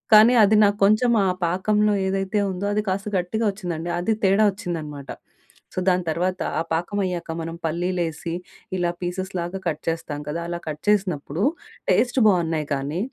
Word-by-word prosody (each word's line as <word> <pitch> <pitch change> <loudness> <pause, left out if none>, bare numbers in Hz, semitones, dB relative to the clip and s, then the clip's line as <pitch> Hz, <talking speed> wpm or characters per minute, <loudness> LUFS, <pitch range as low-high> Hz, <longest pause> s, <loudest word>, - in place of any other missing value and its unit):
కానీ 220 +3 +8
అది 210 +2 +3
నాకు 205 0 +2
కొంచెం 215 +4 +4 0.2
ఆ - - +3 0.2
పాకంలో 210 +4 +2
ఏదైతే 195 +2 0
ఉందో 190 +2 -3
అది 210 - +1
కాస్త 195 +2 -2
గట్టిగా 220 +6 -2
వచ్చిందండి. 175 -4 -5
అది 220 +5 +1
తేడా 195 +3 +4
వచ్చిందనమాట. 160 -8 -6 0.6
సో, - - -2
దాని 180 -1 +3
తర్వాత 180 +3 -1 0.2
ఆ - - +1
పాకమయ్యాక 175 0 -2
మనం 165 +1 -5
పల్లీలేసి 170 -1 -2 0.5
ఇలా 175 -1 +1
పీసెస్ 185 +2 -3
లాగా 175 +3 -4
కట్ 155 -1 -2
చేస్తాం 165 -3 -3
కదా! 160 +3 -2
అలా 175 0 -3
కట్ 150 0 -4
చేసినప్పుడు 180 -5 0 0.5
టేస్ట్ 255 +1 +2
బావున్నాయి 165 -6 +1
కానీ 140 +5 -3
180 Hz, 155 wpm, -23 LUFS, 165-200 Hz, 0.6 s, కానీ